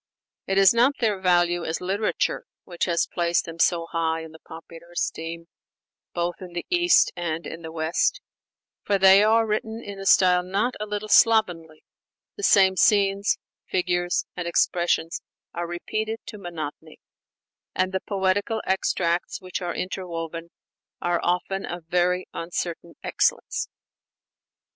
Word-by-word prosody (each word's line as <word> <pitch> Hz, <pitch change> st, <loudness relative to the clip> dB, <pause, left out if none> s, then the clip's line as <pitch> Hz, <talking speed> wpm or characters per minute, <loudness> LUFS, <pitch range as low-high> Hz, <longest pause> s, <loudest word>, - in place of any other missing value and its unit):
It 195 Hz, -, 0 dB
is 195 Hz, +1 st, +7 dB
not 245 Hz, +4 st, +4 dB
their 215 Hz, -5 st, 0 dB
value 175 Hz, -1 st, +2 dB
as 160 Hz, 0 st, -2 dB
literature 195 Hz, +4 st, -1 dB, 0.2 s
which 175 Hz, -2 st, -3 dB
has 170 Hz, -2 st, +1 dB
placed 170 Hz, -1 st, 0 dB
them 165 Hz, 0 st, -9 dB
so 170 Hz, 0 st, +2 dB
high 165 Hz, -1 st, -1 dB
in 160 Hz, -1 st, -9 dB
the 160 Hz, -, -14 dB
popular 165 Hz, +1 st, -12 dB
esteem, 165 Hz, 0 st, -4 dB, 0.7 s
both 175 Hz, +1 st, -2 dB
in 180 Hz, -2 st, -9 dB
the 175 Hz, -, -4 dB
East 350 Hz, 0 st, +4 dB
and 170 Hz, -1 st, -3 dB
in 165 Hz, -, -7 dB
the 160 Hz, -1 st, -8 dB
West; 160 Hz, -, 0 dB, 0.6 s
for 200 Hz, -, +1 dB
they 190 Hz, +1 st, +7 dB
are 225 Hz, +1 st, +4 dB
written 220 Hz, +1 st, -2 dB
in 200 Hz, -1 st, -8 dB
a 195 Hz, -, -4 dB
style 180 Hz, -2 st, +5 dB
not 200 Hz, +7 st, -1 dB
a 210 Hz, -, -4 dB
little 210 Hz, +1 st, -4 dB
slovenly, 180 Hz, -9 st, +3 dB, 0.5 s
the 410 Hz, -, -8 dB
same 190 Hz, -, +5 dB
scenes, 200 Hz, 0 st, +3 dB, 0.3 s
figures, 175 Hz, -1 st, 0 dB
and 180 Hz, -1 st, -4 dB
expressions 170 Hz, -1 st, +1 dB, 0.3 s
are 170 Hz, 0 st, -3 dB
repeated 215 Hz, +6 st, -3 dB
to 210 Hz, -, -9 dB
monotony, 160 Hz, -3 st, -7 dB, 0.8 s
and 185 Hz, 0 st, +1 dB
the 190 Hz, 0 st, -2 dB
poetical 200 Hz, +3 st, 0 dB
extracts 175 Hz, -2 st, 0 dB
which 185 Hz, +1 st, -5 dB
are 175 Hz, -, -3 dB
interwoven 170 Hz, -3 st, -5 dB, 0.5 s
are 175 Hz, -1 st, 0 dB
often 180 Hz, +2 st, -1 dB
of 175 Hz, -2 st, -6 dB
very 180 Hz, +1 st, +1 dB
uncertain 170 Hz, 0 st, -5 dB
excellence. -, -, 0 dB
180 Hz, 145 wpm, -24 LUFS, 170-195 Hz, 0.8 s, is